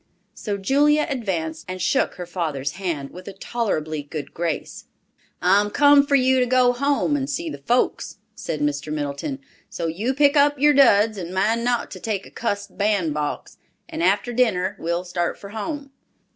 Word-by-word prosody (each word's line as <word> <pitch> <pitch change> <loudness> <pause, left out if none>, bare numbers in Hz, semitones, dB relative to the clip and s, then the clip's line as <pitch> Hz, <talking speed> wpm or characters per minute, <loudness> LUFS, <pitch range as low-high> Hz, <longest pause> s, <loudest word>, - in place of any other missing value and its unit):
So 205 -2 -4
Julia 290 +9 +3
advanced 190 - -3
and 185 0 -5
shook - - +1
her 180 - -6
father's 155 -6 -3
hand 165 -6 -4
with 180 +1 -11
a 200 - -6
tolerably 170 -8 -2
good 145 0 -7
grace. 165 -2 -4 0.6
"I'm 200 +3 +4
come 285 +4 +5
for 285 - +3
you 260 -1 +4
to 250 - +2
go 250 0 +4
home 280 +3 +1
and 275 -1 -2
see 335 -1 -3
the - - -7
folks," 245 +1 0 0.2
said 155 -2 -5
Mr. 145 +1 -1
Middleton; 150 - -3 0.3
"so 170 - -4
you 205 +11 -1
pick 285 +1 +4
up 290 0 +4
your 295 +2 +5
duds—and 210 -8 +4
mind 225 +5 +1
not 240 0 0
to - - -8
take 210 -4 -3
a - - -14
cussed 205 -3 -4
bandbox—and 165 -8 -3
after 200 +7 +1
dinner 225 -7 +1
we'll 170 +2 -2
start 175 -1 -2
for 200 - -10
home." 275 +7 -5
205 Hz, 170 wpm, -23 LUFS, 170-260 Hz, 0.6 s, come